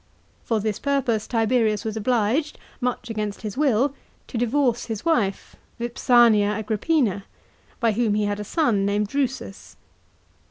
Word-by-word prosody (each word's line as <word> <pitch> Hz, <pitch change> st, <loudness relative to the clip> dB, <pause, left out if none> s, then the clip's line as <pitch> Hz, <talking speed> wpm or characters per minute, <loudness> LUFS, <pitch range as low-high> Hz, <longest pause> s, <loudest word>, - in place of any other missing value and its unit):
For 225 Hz, -2 st, 0 dB
this 210 Hz, -1 st, -2 dB
purpose 260 Hz, -6 st, 0 dB
Tiberius 225 Hz, -2 st, +1 dB
was 220 Hz, -1 st, -3 dB
obliged, 240 Hz, +6 st, 0 dB, 0.2 s
much 245 Hz, -2 st, -2 dB
against 210 Hz, -1 st, -4 dB
his 210 Hz, -2 st, -4 dB
will, 270 Hz, -1 st, +2 dB, 0.4 s
to -, -, -9 dB
divorce 245 Hz, 0 st, +1 dB
his 220 Hz, -3 st, -5 dB
wife 215 Hz, -13 st, 0 dB, 0.2 s
Vips 240 Hz, +1 st, -6 dB, 0.2 s
mia 205 Hz, -1 st, +2 dB
Agrippina, 215 Hz, -, 0 dB, 0.5 s
by 230 Hz, -2 st, +2 dB
whom 215 Hz, -1 st, +1 dB
he 210 Hz, -, +1 dB
had 205 Hz, 0 st, -2 dB
a -, -, -3 dB
son 225 Hz, -, +1 dB
named 200 Hz, +1 st, 0 dB
Drusus. 155 Hz, -, -3 dB
225 Hz, 145 wpm, -23 LUFS, 210-250 Hz, 0.5 s, will